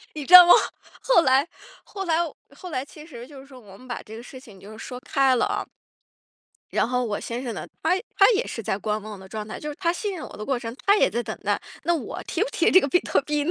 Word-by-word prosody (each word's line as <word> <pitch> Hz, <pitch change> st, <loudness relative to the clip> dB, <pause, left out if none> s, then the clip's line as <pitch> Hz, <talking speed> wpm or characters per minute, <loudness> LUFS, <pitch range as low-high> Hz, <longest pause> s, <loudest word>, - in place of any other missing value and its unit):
你 295 Hz, -2 st, -5 dB
知 355 Hz, -, -1 dB
道 360 Hz, -1 st, +13 dB
吗， 350 Hz, -, +9 dB, 0.5 s
后 -, -, +4 dB
来 270 Hz, +3 st, +3 dB, 0.4 s
后 390 Hz, -2 st, -7 dB
来 330 Hz, 0 st, +1 dB
我 320 Hz, -, -7 dB, 0.2 s
后 360 Hz, +2 st, -9 dB
来 255 Hz, -3 st, -2 dB
其 300 Hz, +2 st, -14 dB
实 245 Hz, -6 st, -11 dB
就 285 Hz, -1 st, -13 dB
是 265 Hz, -, -13 dB
说 265 Hz, -2 st, -14 dB
我 200 Hz, -4 st, -15 dB
们 255 Hz, +4 st, -16 dB
把 245 Hz, -, -5 dB
这 220 Hz, +1 st, -11 dB
个 235 Hz, -, -10 dB
事 260 Hz, +1 st, -11 dB
情 210 Hz, -6 st, -16 dB
就 200 Hz, +3 st, -13 dB
是 220 Hz, -, -12 dB
说 250 Hz, 0 st, -7 dB
开 275 Hz, -2 st, +2 dB
了 240 Hz, -, +2 dB
啊。 -, -, -2 dB, 1.1 s
然 -, -, +1 dB
后 250 Hz, 0 st, 0 dB
我 210 Hz, -3 st, -3 dB
先 240 Hz, +2 st, -5 dB
生 240 Hz, -4 st, -5 dB
呢， -, -, -7 dB, 0.2 s
他 325 Hz, +3 st, +2 dB, 0.2 s
他 395 Hz, +4 st, +6 dB
也 440 Hz, +4 st, -1 dB
是 230 Hz, -, -6 dB
在 195 Hz, -, -2 dB
观 215 Hz, +1 st, -2 dB
望 210 Hz, -1 st, -9 dB
的 190 Hz, -, -13 dB
状 215 Hz, +1 st, -6 dB
态， 215 Hz, -, -7 dB
就 300 Hz, -, -6 dB
是 295 Hz, -, -5 dB
他 335 Hz, -3 st, +1 dB
信 400 Hz, +3 st, -4 dB
任 335 Hz, -, -7 dB
我 -, -, -12 dB
的 210 Hz, -, -6 dB
过 265 Hz, +2 st, -1 dB
程， 230 Hz, 0 st, -7 dB
他 400 Hz, +1 st, +6 dB
也 -, -, +3 dB
在 240 Hz, -, -2 dB
等 -, -, -6 dB
待， -, -, 0 dB, 0.2 s
那 345 Hz, -, +2 dB
我 320 Hz, -, -5 dB
提 -, -, -2 dB
不 455 Hz, -, 0 dB
提 335 Hz, -, +2 dB
这 375 Hz, -, +7 dB
个 280 Hz, -, -2 dB
比 320 Hz, -, +3 dB
特 -, -, 0 dB
币 295 Hz, 0 st, -1 dB
呢？ 330 Hz, -, 0 dB
265 Hz, 310 characters per minute, -24 LUFS, 230-335 Hz, 1.1 s, 道